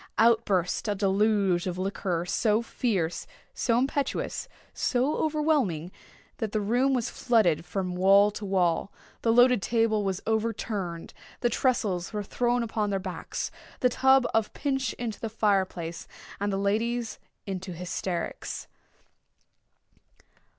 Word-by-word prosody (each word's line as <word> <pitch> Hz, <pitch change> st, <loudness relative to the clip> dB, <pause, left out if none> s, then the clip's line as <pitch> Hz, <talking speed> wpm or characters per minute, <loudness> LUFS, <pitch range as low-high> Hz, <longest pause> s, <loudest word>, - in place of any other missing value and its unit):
Out 230 Hz, -1 st, +5 dB
burst 185 Hz, +1 st, 0 dB
a 205 Hz, -, 0 dB
deluge 195 Hz, -2 st, +2 dB
of 180 Hz, -1 st, -3 dB
liquor 185 Hz, -2 st, -2 dB
so 215 Hz, +4 st, +1 dB
fierce—so 225 Hz, +1 st, -2 dB
impetuous—so 270 Hz, 0 st, -1 dB
overwhelming—that 265 Hz, -, -2 dB
the 215 Hz, -, 0 dB
room 245 Hz, +6 st, +2 dB
was 240 Hz, -3 st, -1 dB
flooded 195 Hz, -10 st, +2 dB
from 185 Hz, 0 st, -3 dB
wall 195 Hz, +3 st, +5 dB
to 210 Hz, -, -7 dB
wall—the 190 Hz, +4 st, -1 dB
loaded 245 Hz, -1 st, +5 dB
table 225 Hz, -1 st, +1 dB
was 190 Hz, -1 st, -1 dB
overturned—the 220 Hz, -2 st, -3 dB
tressels 215 Hz, -8 st, 0 dB
were 210 Hz, -1 st, -2 dB
thrown 240 Hz, +3 st, 0 dB
upon 215 Hz, -2 st, -1 dB
their 195 Hz, -, 0 dB
backs—the 190 Hz, +6 st, -3 dB
tub 265 Hz, +1 st, +4 dB
of 225 Hz, -1 st, +1 dB
punch 270 Hz, -4 st, -1 dB
into 230 Hz, -4 st, -5 dB
the 225 Hz, -, -3 dB
fire 205 Hz, -3 st, +2 dB
place—and 175 Hz, +3 st, -6 dB
the 195 Hz, -, -1 dB
ladies 225 Hz, +4 st, -1 dB, 0.3 s
into 190 Hz, -1 st, -5 dB
hysterics. 180 Hz, 0 st, -4 dB
210 Hz, 115 wpm, -27 LUFS, 185-235 Hz, 0.3 s, Out